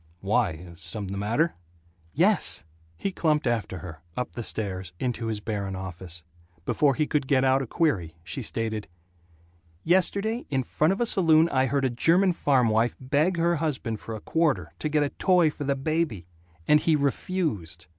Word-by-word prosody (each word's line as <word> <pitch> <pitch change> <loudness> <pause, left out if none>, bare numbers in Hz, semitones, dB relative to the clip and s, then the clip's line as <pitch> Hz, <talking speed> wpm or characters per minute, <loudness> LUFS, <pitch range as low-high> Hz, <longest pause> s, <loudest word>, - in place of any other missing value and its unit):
"Why 95 -5 -1
something 100 +1 -6
the 100 - -3
matter?" 120 +11 +1 0.6
"Yes!" - - +2 0.3
He 195 - -2
clumped 155 -4 +1
after 115 -6 -1
her, 80 -3 -9 0.2
up 125 - -2
the 120 - -6
stairs, 95 -6 -3
into 120 -2 -2
his 110 -2 -2
barren 100 -3 -3
office. 90 -2 -7 0.4
Before 140 -3 +2
he 155 - +1
could 145 -2 -1
get 135 -1 +3
out 130 +1 +3
a 135 - -4
query 100 - 0
she - - -4
stated: 110 -2 -2 1.0
"Yesterday, 200 +6 +1
in 135 -2 0
front 155 +6 +1
of 195 - -1
a - - +3
saloon, 165 -6 +4
I 130 -3 +2
heard 140 +1 0
a 130 - +1
German 175 +9 +3
farm 135 -7 +2
wife 115 +2 +2
beg 150 +7 +1
her 170 0 +2
husband 130 -8 -2
for 115 - -6
a - - -6
quarter, 120 - 0
to 155 - -1
get 150 -1 +2
a 145 - 0
toy 180 -3 +3
for 145 - -6
the 140 0 +1
baby 145 - -1 0.4
and 150 - +6
he 160 0 +2
refused. 140 - -2
130 Hz, 175 wpm, -26 LUFS, 105-160 Hz, 1.0 s, and